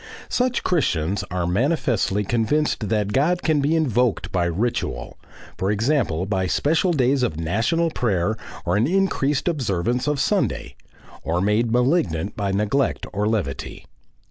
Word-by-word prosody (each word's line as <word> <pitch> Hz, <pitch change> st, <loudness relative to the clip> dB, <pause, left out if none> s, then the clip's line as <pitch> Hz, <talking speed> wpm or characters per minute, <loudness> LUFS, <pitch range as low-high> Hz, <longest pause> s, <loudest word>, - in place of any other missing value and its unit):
Such 250 Hz, 0 st, 0 dB
Christians 100 Hz, -, 0 dB
are 90 Hz, -1 st, -2 dB
manifestly 105 Hz, -, +1 dB
convinced 115 Hz, +1 st, 0 dB
that 105 Hz, -1 st, 0 dB
God 170 Hz, +6 st, +2 dB
can 155 Hz, -3 st, +2 dB
be 150 Hz, +4 st, +2 dB
invoked 125 Hz, -7 st, +1 dB
by 90 Hz, -2 st, +1 dB
ritual 85 Hz, -, -2 dB, 0.4 s
for 95 Hz, -, 0 dB
example 105 Hz, -, +1 dB
by 95 Hz, -2 st, -1 dB
special 160 Hz, -, +1 dB
days 135 Hz, -3 st, +2 dB
of 80 Hz, -11 st, -1 dB
national 115 Hz, -, 0 dB
prayer 110 Hz, -, 0 dB, 0.3 s
or 85 Hz, -, +1 dB
an 115 Hz, +5 st, +2 dB
increased 155 Hz, -6 st, +1 dB
observance 125 Hz, -, 0 dB
of 150 Hz, -1 st, 0 dB
Sunday 195 Hz, +8 st, 0 dB, 0.5 s
or 85 Hz, +2 st, 0 dB
made 105 Hz, +4 st, +1 dB
malignant 120 Hz, -, +1 dB
by 100 Hz, -2 st, -1 dB
neglect 105 Hz, +7 st, 0 dB
or 105 Hz, +1 st, 0 dB
levity. 110 Hz, -4 st, -3 dB
115 Hz, 140 wpm, -22 LUFS, 95-145 Hz, 0.5 s, God